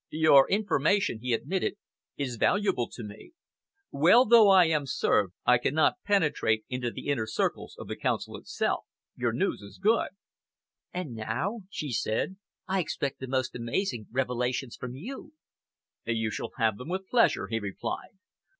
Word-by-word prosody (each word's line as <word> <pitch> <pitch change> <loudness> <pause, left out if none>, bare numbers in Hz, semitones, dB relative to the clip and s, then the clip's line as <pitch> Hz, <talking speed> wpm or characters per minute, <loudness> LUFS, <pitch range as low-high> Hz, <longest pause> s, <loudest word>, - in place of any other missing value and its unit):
"Your 155 -3 +5
information," 200 - +1
he 125 +1 -2
admitted, 185 - -1 0.4
"is 130 -4 -3
valuable 190 - +1
to 120 - -8
me. 105 - -11 0.6
Well 180 - +6
though 225 -2 +7
I 190 -2 +7
am 155 -3 0
served, 100 -7 +1
I 125 -1 +5
cannot 155 - +1
penetrate 150 - +1
into 125 -1 -2
the - - -9
inner 115 -6 0
circles 110 - -2
of - - -8
the - - -4
Council - - -2
itself. - - -2 0.3
Your - - 0
news - - -1
is 100 0 -12
good." 225 +3 +2 0.8
"And 180 -8 -5
now," 125 - -3
she 150 -7 -5
said, 115 - -1 0.3
"I 190 0 +1
expect 140 -5 -2
the 130 - -6
most 130 0 -1
amazing 120 - -2
revelations 125 0 -1
from 125 0 -7
you." 255 - -8 0.7
"You 110 -2 -1
shall - - -4
have 110 -4 +1
them, 125 - -8
with 190 +1 -3
pleasure," 230 - +3
he 115 +3 -2
replied. 100 - -5
135 Hz, 155 wpm, -28 LUFS, 115-190 Hz, 0.8 s, though